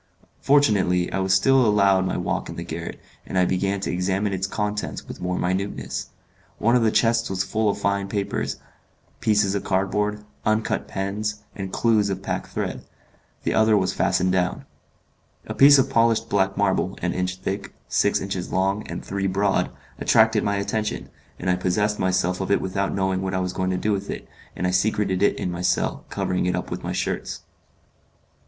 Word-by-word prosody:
Fortunately, 100 -11 +3
I - - 0
was 95 0 0
still 130 +8 +5
allowed 100 -3 +4
my - - -1
walk - - -2
in - - -6
the 85 - -5
garret, 85 0 -6 0.2
and - - -4
I 90 - +4
began 95 +2 0
to - - -2
examine 95 +3 0
its 95 +1 -1
contents 105 0 -3
with - - -9
more 90 0 -1
minuteness. 95 +3 -2 0.5
One 115 +3 +3
of 125 - +4
the 115 - +4
chests 115 +1 +2
was 95 0 0
full 110 +2 0
of 100 - -1
fine 100 -1 0
paper, 100 -1 -1 0.8
pieces 105 -3 +2
of 100 -1 -2
cardboard, 105 +2 0 0.2
uncut 110 0 0
pens, 105 +2 -3
and 95 -2 -5
clews 110 -3 +2
of 95 0 -3
pack - - -3
thread; - - -4 0.6
the - - 0
other 110 -1 +4
was 95 -2 +1
fastened 95 0 +1
down. 90 -1 0 0.8
A - - -5
piece 140 +1 +8
of 135 - +3
polished 115 -1 +2
black 95 -1 +1
marble, - - +1
an - - 0
inch 90 0 -1
thick, 100 +2 -4 0.2
six - - +2
inches 95 -2 -4
long, 95 +2 +1
and - - -6
three 100 0 -1
broad, 100 +1 +1 0.3
attracted 110 -1 +4
my 100 - 0
attention, 105 +2 -2 0.3
and - - -5
I 90 - +3
possessed 105 +3 0
myself 90 0 +1
of 95 - -3
it 100 - +3
without 95 +1 -2
knowing 95 -1 0
what 95 0 -2
I - - +1
was 90 0 -2
going 95 0 -1
to 95 - 0
do 105 - 0
with 100 -1 -2
it, - - -5 0.3
and - - -2
I 90 - +2
secreted 95 0 +1
it 100 - +3
in 90 - -2
my 85 0 -4
cell, 90 - 0
covering 90 0 -1
it 90 - +1
up 90 - -4
with - - -4
my - - -3
shirts. - - -3
100 Hz, 190 wpm, -24 LUFS, 95-105 Hz, 0.8 s, piece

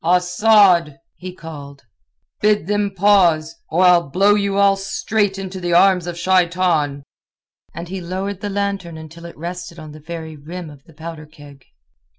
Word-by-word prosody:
"Asad!" 180 -2 +4 0.2
he 185 0 -8
called. 145 -6 -11 0.6
"Bid 210 -4 +2
them 205 +1 0
pause, 175 -5 +3 0.2
or 175 +4 +2
I'll 175 -4 +4
blow 195 +7 +3
you 200 -1 0
all 200 -1 +4
straight 195 +1 -1
into 190 -1 -6
the 175 -1 -2
arms 180 0 +4
of 175 -1 -5
Shaitan." 175 -5 +1 0.7
And 170 +1 -6
he 190 +1 -6
lowered 190 +2 -4
the 205 - -3
lantern 195 -4 -3
until 160 +2 -11
it 170 - -13
rested 170 +1 -7
on 155 -2 -10
the 155 - -12
very 160 0 -8
rim 160 +3 -8
of 145 0 -17
the 165 - -19
powder 160 -1 -9
keg. 145 -3 -16
175 Hz, 160 wpm, -19 LUFS, 160-195 Hz, 0.7 s, Asad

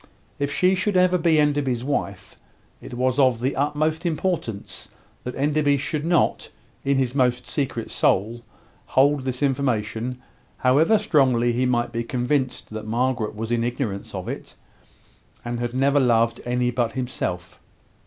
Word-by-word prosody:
If 140 0 -1
she 185 +5 +3
should 190 +1 0
ever 180 0 +4
be 165 -2 +3
Enderby's 145 -5 +1
wife, 140 +1 -3 0.5
it - - -8
was 130 +2 0
of 130 -4 +4
the 130 +3 -1
utmost 155 +3 0
importance 165 - -3 0.3
that 125 - -5
Enderby 145 0 +2
should 150 +2 -3
not, 170 -1 +1 0.3
in 140 0 +1
his 130 -2 0
most 125 -2 +1
secret 135 -5 -3
soul, 115 +5 +1 0.5
hold 140 0 +3
this 130 +1 -2
information, 125 -3 -1 0.4
however 150 +12 +4
strongly 130 - +2
he 125 +2 +1
might 120 -1 0
be 115 0 -2
convinced 125 +1 -1
that 110 0 -6
Margaret 120 -1 -1
was 110 +2 -4
in 120 -1 +1
ignorance 120 -5 -3
of - - -5
it, - - -6 0.9
and 120 0 -3
had 120 0 -3
never 140 +2 +3
loved 115 -2 +2
any 125 0 0
but 120 -2 -1
himself. 110 -9 -4
130 Hz, 150 wpm, -23 LUFS, 120-145 Hz, 0.9 s, ever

